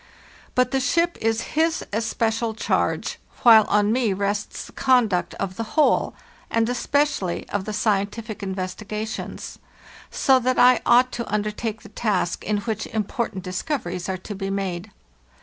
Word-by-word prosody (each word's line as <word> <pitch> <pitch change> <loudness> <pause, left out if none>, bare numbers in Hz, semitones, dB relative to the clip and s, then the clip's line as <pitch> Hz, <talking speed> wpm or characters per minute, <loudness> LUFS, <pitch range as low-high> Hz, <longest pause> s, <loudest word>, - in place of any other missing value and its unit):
But 250 0 +3
the 270 - +2
ship 335 +6 +1
is 225 0 +1
his 320 +1 +1
especial 225 +1 0
charge, - - -1 0.2
while 225 -3 +8
on 205 0 +2
me 230 -4 +2
rests 200 +1 -2
the - - -13
conduct 225 -10 +2
of 185 0 -4
the 230 - -1
whole, 305 - +3 0.3
and 230 0 +1
especially 265 -6 0
of 200 -2 -2
the 215 - -3
scientific 215 +1 -1
investigations; 200 +3 -5 0.5
so 265 -1 +3
that 255 +1 0
I 250 -1 +6
ought 250 +1 +5
to 235 -3 -5
under 210 0 0
take 215 0 -5
the - - -12
task 200 -5 -1
in 205 +1 0
which 220 +1 -3
important 215 -2 -3
discoveries 185 - -3
are 190 - -1
to 195 +3 -7
be 195 -1 -4
made. 195 -1 -3
215 Hz, 150 wpm, -23 LUFS, 195-240 Hz, 0.5 s, while